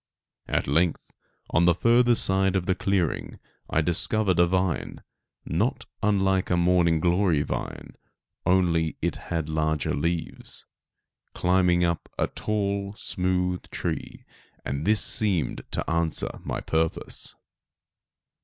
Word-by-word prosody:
At - - 0
length, 80 +4 0 0.4
on 85 +2 +3
the 85 -1 +4
further 120 +4 +4
side 95 -2 +2
of 95 -2 0
the 95 - +2
clearing, 95 -3 -1 0.3
I 80 - +2
discovered 95 +3 +1
a 85 - +6
vine, 90 -1 -1 0.4
not - - -1 0.2
unlike 95 -2 +2
a 90 - +2
morning 85 -2 +3
glory 85 -2 +2
vine, - - -5 0.5
only 85 -3 +2
it - - 0
had 80 -3 -3
larger 80 -1 0
leaves, 85 +3 -3 0.7
climbing 90 -1 +3
up 85 -1 -1
a - - +2
tall, 100 -1 -2
smooth 90 -1 -1
tree, - - -4 0.4
and 70 +6 -3
this 105 0 +3
seemed 95 - 0
to - - -3
answer 85 -1 -1
my - - -3
purpose. 80 0 -2
90 Hz, 120 wpm, -26 LUFS, 80-95 Hz, 0.7 s, a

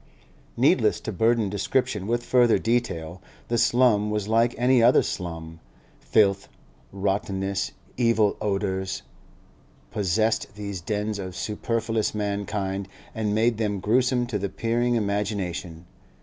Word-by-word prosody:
Needless - - +3
to - - -4
burden 115 -1 +2
description 105 0 -1
with 120 +1 -1
further 120 -3 +4
detail; 95 -8 -2 0.3
the 120 - +1
slum 120 -3 +3
was 105 -1 -2
like 115 +2 +2
any 125 0 +4
other 120 +2 +5
slum; 80 -2 -5 0.4
filth, 100 -2 +2 0.4
rottenness, 95 0 -2 0.2
evil 115 -4 +3
odours, 95 -2 -2 0.9
possessed 110 +3 0
these 100 -3 -5
dens 105 +2 -2
of 95 -2 -6
superfluous 115 +1 -2
mankind 100 -1 -2 0.3
and 105 -2 -1
made 115 0 +2
them 105 -3 -1
gruesome 125 +4 +2
to 115 -4 -3
the 100 0 -2
peering 120 +3 0
imagination. 100 -5 -2
105 Hz, 120 wpm, -25 LUFS, 95-115 Hz, 0.9 s, other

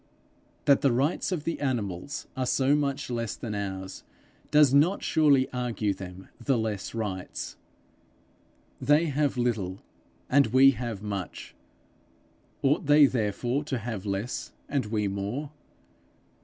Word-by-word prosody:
That 140 -1 +5
the 140 - +4
rights 140 +10 0
of 170 -5 -2
the 165 - -2
animals 120 -4 -3
are 130 -1 -1
so 135 +2 +3
much 140 -2 -1
less 115 -2 -2
than 110 -3 -5
ours, 95 -2 -5 0.5
does 150 -3 +5
not 160 +8 +4
surely 145 -4 +4
argue 120 -5 -1
them 95 0 -9 0.2
the 135 0 +2
less 110 -2 -3
rights! 95 -5 -4 1.3
They 150 +3 +4
have 145 -3 0
little, 105 -6 -1 0.4
and 140 0 +4
we 130 +4 +6
have 115 -4 -5
much; 100 -4 -5 1.1
ought 140 +1 +2
they 145 0 +7
therefore 120 +3 0
to 135 -3 -2
have 110 -4 -5
less 100 +4 -3
and 140 -6 -1
we 105 -1 0
more? 100 +10 -3
125 Hz, 130 wpm, -27 LUFS, 105-140 Hz, 1.3 s, they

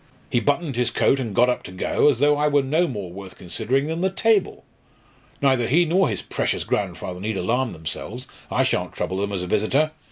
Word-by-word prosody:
He 120 - +3
buttoned 145 0 0
his 125 -1 +2
coat 135 +3 +2
and 115 -6 -4
got 125 - +5
up 125 - 0
to - - -10
go, 95 +9 +2
as 140 - +1
though 145 +3 +4
I 150 +1 +1
were 145 -1 +3
no 155 +6 +2
more 100 - -5
worth 95 0 -10
considering 130 +9 -1
than 160 +2 -3
the 190 - +2
table. 210 +1 +1 0.8
Neither 130 -4 +3
he 170 +6 +4
nor 180 +2 +2
his 105 - -3
precious - - -1
grandfather 90 0 -3
need 105 +1 -3
alarm 120 +7 0
themselves: 95 +9 -6 0.2
I - - +2
shan't - - -1
trouble 95 - -3
them 100 +1 -2
as 95 -2 -2
a - - -5
visitor. 120 - +1
125 Hz, 215 wpm, -23 LUFS, 100-150 Hz, 0.8 s, got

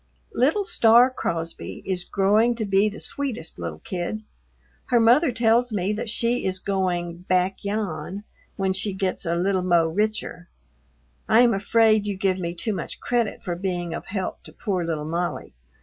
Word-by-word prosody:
Little 315 - +2
Star 240 - +5
Crosby 165 -8 -4
is 185 -2 -1
growing 210 +5 +3
to 225 -2 -2
be 200 +1 +3
the 210 - -9
sweetest 250 - -4
little 85 -3 -5
kid. 185 +4 -4 0.6
Her 245 -2 +3
mother 245 +6 +5
tells 235 +1 +2
me 200 0 0
that 220 +2 -4
she 235 +2 0
is 185 -1 -1
going 180 -3 -2
"back 185 +1 +1
yan" 200 -2 -3 0.3
when 190 -1 0
she 195 +1 -2
gets 190 -1 -2
a 170 - +1
"little 185 +2 +1
mo' 175 -2 +3
richer." 195 0 -2 0.8
I 225 +2 +6
am 240 -2 +5
afraid 215 +1 +3
you 200 -2 -2
give 190 -1 0
me 170 -1 -3
too 215 +5 -2
much - - -5
credit 235 -4 -1
for 175 -2 -3
being 175 -2 -3
of - - -6
help 190 -2 -4
to - - -11
poor 185 -4 -2
little 160 -3 -3
Molly. 170 +3 -3
195 Hz, 170 wpm, -24 LUFS, 180-225 Hz, 0.8 s, I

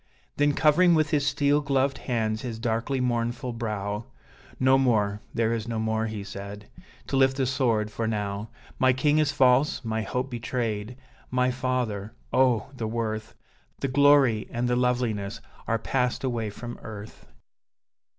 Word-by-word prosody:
Then, 145 0 +3
covering 170 +4 +5
with 155 -1 +2
his 145 -2 +2
steel 145 0 +2
gloved 135 -1 +1
hands 110 -3 -1
his 120 -3 -5
darkly 115 +4 -1
mournful 120 0 -1
brow, 105 -2 -3 0.5
"No 130 +1 +5
more, 105 -5 +1
there 115 0 +1
is 115 -1 -3
no 115 -1 -2
more," 110 0 0
he 110 -2 -5
said, 100 +1 -8 0.4
"to - - -3
lift 135 0 +4
the 135 - +1
sword 115 -5 +1
for 110 +1 -2
now. 105 -1 -3 0.3
My 130 0 +5
king 150 +4 +2
is 150 -2 +2
false, 130 -1 +3
my 110 0 -1
hope 125 +4 -3
betrayed, 115 -1 -3 0.3
my 125 0 +2
father 120 -5 -2 0.2
oh! 125 -2 +3
the 115 -3 -3
worth, 110 -1 -3 0.5
The 135 - 0
glory 135 -5 +4
and 120 +1 -1
the 125 - +2
loveliness, 120 -4 0 0.3
are 115 - +2
passed 125 +3 -1
away 120 -4 -1
from 120 +3 -8
earth! 110 -1 -10
120 Hz, 155 wpm, -26 LUFS, 110-130 Hz, 0.5 s, covering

